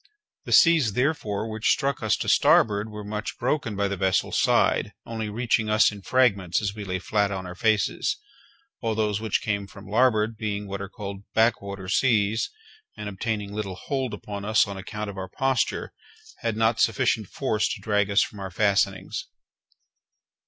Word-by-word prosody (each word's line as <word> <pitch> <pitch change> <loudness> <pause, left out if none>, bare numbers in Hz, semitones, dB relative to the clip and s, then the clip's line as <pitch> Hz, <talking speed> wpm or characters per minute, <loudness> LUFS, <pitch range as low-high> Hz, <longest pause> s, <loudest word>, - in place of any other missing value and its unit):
The - - -6
seas, 160 - +5
therefore, 115 -5 -1
which 110 0 -1
struck 140 -1 +1
us 110 -1 +2
to - - -4
starboard 105 0 +4
were 105 -1 -7
much 105 +1 -5
broken, 130 -3 -1
by 100 0 +1
the 100 - -2
vessel's 95 -1 +1
side, - - +2
only 110 -2 -4
reaching 110 0 0
us 110 +1 +5
in 100 -1 -10
fragments 100 -7 +2
as 100 -2 -2
we 105 0 -7
lay 95 -1 -2
flat 100 +2 0
on 95 -1 -4
our 90 - -6
faces; 110 - +1 0.6
while 115 -2 -1
those 105 -1 0
which 110 -3 0
came 100 -2 -1
from 100 0 -13
larboard 110 -1 +2
being 105 -2 -3
what 100 0 -5
are 100 - -6
called 100 -1 -6 0.2
back 115 +1 +3
water 100 -2 -7
seas, 110 0 +2 0.5
and 105 -1 -5
obtaining 105 0 -3
little 100 -3 -4
hold 130 +4 -3
upon 100 -1 -7
us 105 -1 +3
on 100 - -6
account 105 +2 -6
of 95 - -8
our 95 - -5
posture, 135 -2 -1 0.5
had 115 -4 -2
not 115 0 +2
sufficient 110 -1 +2
force 110 -4 -1
to - - -4
drag 105 -2 +1
us 100 +1 +4
from 105 - -8
our 95 -1 -5
fastenings. 95 0 0
105 Hz, 180 wpm, -25 LUFS, 100-110 Hz, 0.6 s, seas